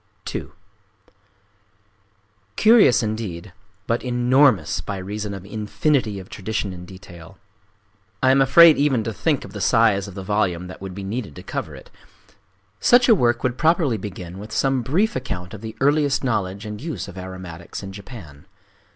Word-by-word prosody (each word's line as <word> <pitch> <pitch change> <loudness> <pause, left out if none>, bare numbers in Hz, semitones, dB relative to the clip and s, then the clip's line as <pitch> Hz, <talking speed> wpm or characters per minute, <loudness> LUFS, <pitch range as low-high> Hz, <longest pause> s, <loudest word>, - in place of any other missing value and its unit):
II - - -4 2.1
Curious 215 - +5
indeed, 105 -5 -5 0.3
but 115 +2 -1
enormous 125 - +3
by 100 - -4
reason 105 +2 -5
of 95 -1 -9
it 100 - -14
infinity 110 +1 0
of 95 -1 -9
tradition 100 -1 -4
and 90 0 -10
detail. 95 -1 -13 0.9
I 130 - +5
am 135 +1 +4
afraid 155 +4 +7
even 140 -5 +2
to 115 - -4
think 150 +4 -1
of - - -12
the - - -6
size 110 -4 +3
of 95 - -10
the 95 - -6
volume 95 -3 0
that 90 - -11
would 95 -2 -7
be 100 - -6
needed 100 - -5
to - - -10
cover - - -5
it…. - - -14 0.9
Such 245 0 +5
a - - +9
work 120 - +1
would 125 0 -1
properly 160 - +2
begin 95 -2 -8
with 105 +2 -9
some 135 +1 +1
brief 180 - 0
account 95 -8 -5
of 105 - -8
the 110 -1 -7
earliest 145 0 +2
knowledge 100 -4 -2
and 105 0 -7
use 160 -6 -5
of 100 - -10
aromatics 95 -2 -8
in 95 0 -7
Japan. 95 - -11
110 Hz, 170 wpm, -22 LUFS, 95-130 Hz, 2.1 s, a